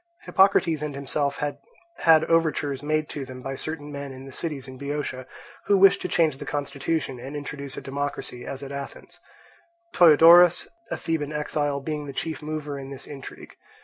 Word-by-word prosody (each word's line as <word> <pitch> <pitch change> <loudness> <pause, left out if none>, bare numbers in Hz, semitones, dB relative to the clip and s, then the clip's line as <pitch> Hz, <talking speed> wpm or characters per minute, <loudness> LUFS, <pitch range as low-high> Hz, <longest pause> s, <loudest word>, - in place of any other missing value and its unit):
Hippocrates 190 -5 +3
and 150 -2 -4
himself 140 +1 -2
had 145 -1 -3 0.4
had 160 -1 +6
overtures 155 -5 +1
made 155 +1 0
to 145 - -5
them 130 -1 -9
by 135 - -4
certain 150 +1 -5
men 140 -1 -6
in 130 0 -10
the 135 - -10
cities 140 -2 -4
in 130 -1 -10
Boeotia, 140 -2 -4 0.4
who 200 - +5
wished 195 +1 +6
to - - -2
change 160 -5 +2
the - - -7
constitution 140 -1 -2
and 135 +4 -7
introduce 140 -1 -6
a - - -4
democracy 140 -3 -4
as 135 +2 -6
at 140 - -7
Athens; 140 0 -8 0.7
Ptoeodorus, 170 +1 +7 0.2
a - - -2
Theban 155 -3 -2
exile, 150 -1 -1
being 150 0 -4
the 140 - -6
chief 160 +5 -4
mover 150 -2 -4
in 135 0 -8
this 140 -1 -8
intrigue. 140 -2 -10
145 Hz, 180 wpm, -25 LUFS, 140-155 Hz, 0.7 s, Ptoeodorus